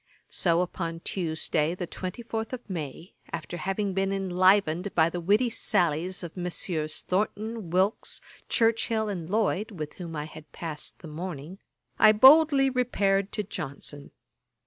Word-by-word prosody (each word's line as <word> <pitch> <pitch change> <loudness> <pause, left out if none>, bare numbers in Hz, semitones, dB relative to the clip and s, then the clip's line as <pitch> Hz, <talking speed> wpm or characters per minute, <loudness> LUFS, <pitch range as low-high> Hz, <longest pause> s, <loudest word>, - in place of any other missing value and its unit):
So 170 -1 +2
upon 170 -2 -3
Tuesday 160 -2 -1
the 180 - -4
24th 225 +6 -5
of 250 -1 -6
May, 165 -2 -6 0.2
after 170 +1 -5
having 195 +2 -1
been 195 +1 0
enlivened 190 -1 +2
by 165 0 +4
the 175 - -3
witty 210 +8 +2
sallies 180 -4 0
of 170 - -7
Messieurs 170 -3 -2
Thornton, 215 +1 -2
Wilkes, 190 +5 +1 0.3
Churchill 225 -1 +2
and 175 -5 -4
Lloyd, 215 0 +1
with 155 -8 -6
whom 170 -2 -6
I 150 0 -3
had 155 -1 -12
passed 155 -3 -6
the 165 - -11
morning, 165 +2 -6 0.4
I 215 -1 +8
boldly 275 +4 +7
repaired 205 -6 +1
to 210 - -1
Johnson. 145 -5 -6
185 Hz, 140 wpm, -27 LUFS, 165-210 Hz, 0.4 s, I